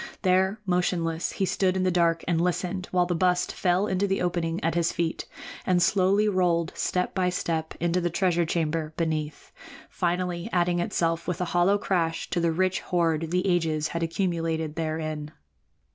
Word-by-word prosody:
There, 190 +2 +2
motionless, 175 -2 0
he 195 - 0
stood 190 0 +1
in 185 - 0
the 185 - +2
dark 170 -1 +2
and 170 -2 +1
listened 180 +1 -1
while 180 -1 +2
the 175 - -1
bust 180 +1 +1
fell 180 +2 +1
into 195 0 0
the 195 0 0
opening 170 -1 -1
at 165 - +1
his 170 -1 +1
feet, 165 -1 -2 0.4
and 180 -2 +2
slowly 195 +3 +3
rolled, 175 -4 +1
step 180 0 -1
by 185 -2 +1
step, 165 -3 -2
into 175 +2 +1
the 175 - 0
treasure 175 0 +1
chamber 160 -1 -1
beneath, 155 -3 -3 0.4
finally 175 +2 -1
adding 175 -1 +1
itself 165 -1 -1
with 180 0 -2
a 180 - 0
hollow 175 +3 +4
crash 165 -5 -1
to 175 - +1
the 170 -1 +2
rich 185 +3 +1
hoard 165 -3 0
the 180 +2 0
ages 160 -4 +1
had 170 - -3
accumulated 165 -2 -1
therein. 155 -2 -3
175 Hz, 175 wpm, -26 LUFS, 165-185 Hz, 0.4 s, hollow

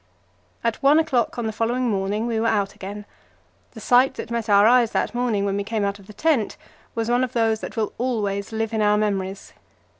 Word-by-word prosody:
At 230 -1 -1
one 280 +2 +5
o'clock 275 -9 +1
on 240 - -2
the 220 - -1
following 240 +3 0
morning 205 +1 -1
we 230 -2 -1
were 230 - +1
out 205 -3 0
again. 205 +2 -8 0.7
The 225 - -10
sight 250 +4 +3
that - - -7
met 230 -1 -2
our 200 0 +6
eyes 235 0 +4
that - - 0
morning, 240 -5 0
when 200 0 -1
we 200 - -1
came 215 0 -1
out 200 0 -3
of 195 - -17
the - - -10
tent, 270 -2 0 0.4
was 225 -1 -1
one 245 +1 +2
of 255 -1 -3
those 225 -2 +1
that - - -8
will 215 -1 -1
always 210 -5 -2
live 225 0 -2
in 220 - 0
our 210 0 +3
memories. 195 -2 -2
220 Hz, 220 wpm, -23 LUFS, 205-240 Hz, 0.7 s, our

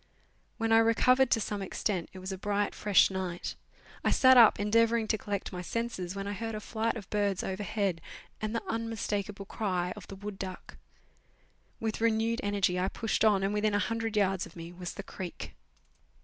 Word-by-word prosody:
When 225 0 0
I 225 - +7
recovered 250 +3 +4
to 225 - +3
some 205 -1 -3
extent 190 -2 -2
it - - -12
was 185 +1 -6
a 190 - -4
bright, 205 +1 0
fresh 205 -2 +4
night. 185 -2 -3 0.5
I - - +3
sat 260 0 +6
up 230 -5 +7
endeavouring 225 +2 +3
to - - +3
collect 200 -2 -4
my 180 - -4
senses, 195 -3 -3
when 195 0 -4
I 205 - -3
heard 225 +2 -4
a - - -3
flight 225 +2 -2
of 200 -4 -9
birds 205 -3 0
overhead 195 -2 -2 0.4
and 215 +1 -2
the 230 - -3
unmistakable 210 -3 -3
cry 180 -4 -2
of - - -11
the 195 - -8
wood 205 0 -7
duck. 185 -1 -7 1.0
With 225 -1 -3
renewed 230 0 +2
energy 200 -3 +1
I 185 - +1
pushed 225 +2 -1
on, 205 -3 +4
and 195 +1 0
within 210 0 +1
a - - +4
hundred 225 +2 -1
yards 195 -2 +1
of - - -17
me 170 0 -8
was 180 -1 -6
the - - -6
creek. 180 -2 -7
205 Hz, 190 wpm, -30 LUFS, 190-225 Hz, 1.0 s, I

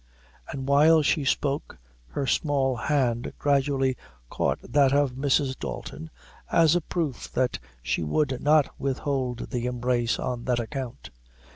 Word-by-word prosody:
And 135 -1 -5
while 155 +3 +5
she 145 +1 +2
spoke, 140 +1 -1 0.3
her 135 - -3
small 135 -2 +1
hand 120 -2 0
gradually 135 -2 +1 0.4
caught - - 0
that 140 -2 +3
of 140 -2 +3
Mrs. 135 0 +1
Dalton, 160 +1 -6 0.4
as 165 0 +5
a 175 - +2
proof 155 -6 -3
that 130 -1 0 0.2
she - - -1
would 130 - 0
not 150 -1 +4
withhold 130 -2 -2
the 120 0 -1
embrace 120 -1 0
on 125 -2 -3
that 125 -2 +1
account. 125 +1 -6
135 Hz, 135 wpm, -26 LUFS, 125-145 Hz, 0.4 s, while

